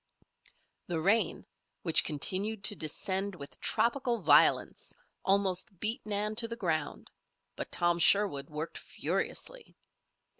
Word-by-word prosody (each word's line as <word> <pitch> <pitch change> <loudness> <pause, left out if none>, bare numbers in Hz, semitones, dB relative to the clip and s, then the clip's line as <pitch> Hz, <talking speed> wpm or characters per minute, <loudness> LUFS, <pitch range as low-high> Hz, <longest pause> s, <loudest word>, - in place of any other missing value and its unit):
The 170 -2 -2
rain, 200 +8 +1 0.4
which 165 -3 +4
continued 195 +8 -2
to 205 - 0
descend 190 +5 -3
with 140 -4 -9
tropical 240 -1 0
violence, - - +3 0.3
almost 190 -1 +1
beat 220 +2 0
Nan 210 +1 0
to 230 0 +3
the 230 - -5
ground; 165 -9 -3 0.4
but - - -6
Tom 175 0 +1
Sherwood 170 -6 +3
worked 155 +2 -5
furiously. - - -4
195 Hz, 115 wpm, -31 LUFS, 165-215 Hz, 0.4 s, which